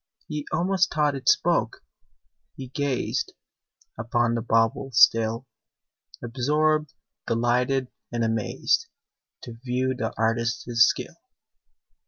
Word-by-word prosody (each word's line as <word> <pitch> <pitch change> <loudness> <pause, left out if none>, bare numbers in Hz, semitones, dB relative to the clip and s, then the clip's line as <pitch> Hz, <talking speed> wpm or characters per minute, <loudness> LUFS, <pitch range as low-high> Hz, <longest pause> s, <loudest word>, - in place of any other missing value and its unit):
He 150 -2 -5
almost 185 +3 +1
thought 150 -2 +1
it 135 -2 0
spoke: - - +1 0.7
he 130 -2 -8
gazed 140 -1 -2 0.7
Upon 120 +1 0
the 115 - -1
bauble 115 +3 +1
still, 115 +2 +4 0.8
Absorbed, 150 +5 0 0.3
delighted, 125 +3 +1 0.2
and 120 -1 -1
amazed, 110 -2 0 0.6
To 115 -1 -10
view 130 +1 -1
the 120 -3 -3
artist's 115 +1 0 0.2
skill. - - -3
125 Hz, 100 wpm, -25 LUFS, 115-140 Hz, 0.8 s, still